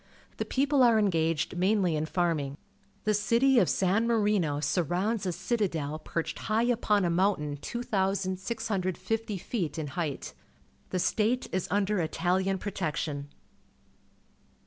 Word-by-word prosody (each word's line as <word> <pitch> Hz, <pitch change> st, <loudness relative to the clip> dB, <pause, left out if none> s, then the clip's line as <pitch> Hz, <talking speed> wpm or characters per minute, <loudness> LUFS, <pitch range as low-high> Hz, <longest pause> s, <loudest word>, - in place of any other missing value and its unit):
The -, -, -2 dB
people 280 Hz, +1 st, +2 dB
are 235 Hz, -3 st, +6 dB
engaged 165 Hz, -6 st, +1 dB
mainly 185 Hz, -2 st, +2 dB
in 155 Hz, +1 st, -1 dB
farming. 155 Hz, -6 st, -1 dB, 0.5 s
The 215 Hz, -, +2 dB
city 235 Hz, +6 st, +4 dB
of -, -, +3 dB
San 195 Hz, +5 st, +2 dB
Marino 205 Hz, -10 st, +2 dB
surrounds 185 Hz, +7 st, 0 dB
a -, -, +1 dB
citadel 175 Hz, -6 st, -1 dB
perched 165 Hz, +1 st, -4 dB
high 220 Hz, +2 st, +3 dB
upon 215 Hz, -5 st, +2 dB
a 170 Hz, -, +1 dB
mountain 170 Hz, -5 st, +1 dB
2,650 200 Hz, -, -2 dB
feet 180 Hz, -, -3 dB
in 155 Hz, -2 st, -3 dB
height. 155 Hz, -3 st, -4 dB, 0.6 s
The 185 Hz, -, -1 dB
state 220 Hz, +7 st, +1 dB
is 185 Hz, -1 st, -1 dB
under 205 Hz, +1 st, +1 dB
Itahan 185 Hz, +4 st, 0 dB
protection. 155 Hz, -7 st, -3 dB
190 Hz, 125 wpm, -29 LUFS, 165-215 Hz, 0.6 s, are